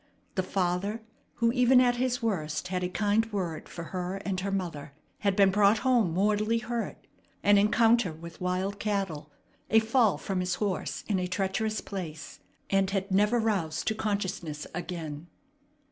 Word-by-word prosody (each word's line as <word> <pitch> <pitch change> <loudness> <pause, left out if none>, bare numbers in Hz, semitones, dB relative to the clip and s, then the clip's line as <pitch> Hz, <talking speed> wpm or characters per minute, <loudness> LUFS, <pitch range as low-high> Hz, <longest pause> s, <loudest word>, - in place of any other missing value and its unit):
The 185 - +1
father, 190 +4 -1 0.3
who 230 -1 +2
even 250 +1 +5
at 245 -1 +3
his 250 0 0
worst 170 -5 -1
had 180 -1 -1
a 180 - -1
kind 205 +3 +2
word 175 -6 -3
for 170 - -7
her 180 0 -2
and 190 -2 -1
her 195 +2 -2
mother, 170 -7 -4 0.3
had 200 -2 +1
been 195 -1 +5
brought 205 +2 +4
home 240 -9 +3
mortally 210 +3 +2
hurt 230 +1 -4 0.4
an 205 0 +6
encounter 225 -1 +4
with 165 +3 -11
wild 185 +2 -1
cattle, 195 -8 -2 0.4
a 220 - +5
fall 225 -1 +3
from 190 -2 -3
his 180 0 0
horse 200 -4 -2
in 200 -3 +1
a 180 - -1
treacherous 195 +4 -1
place 160 -6 -7 0.3
and 195 -1 +3
had 195 0 -2
never 210 +5 +3
roused 195 -8 -1
to - - 0
consciousness 190 -8 -3
again. 165 -3 -5
195 Hz, 160 wpm, -28 LUFS, 180-215 Hz, 0.4 s, an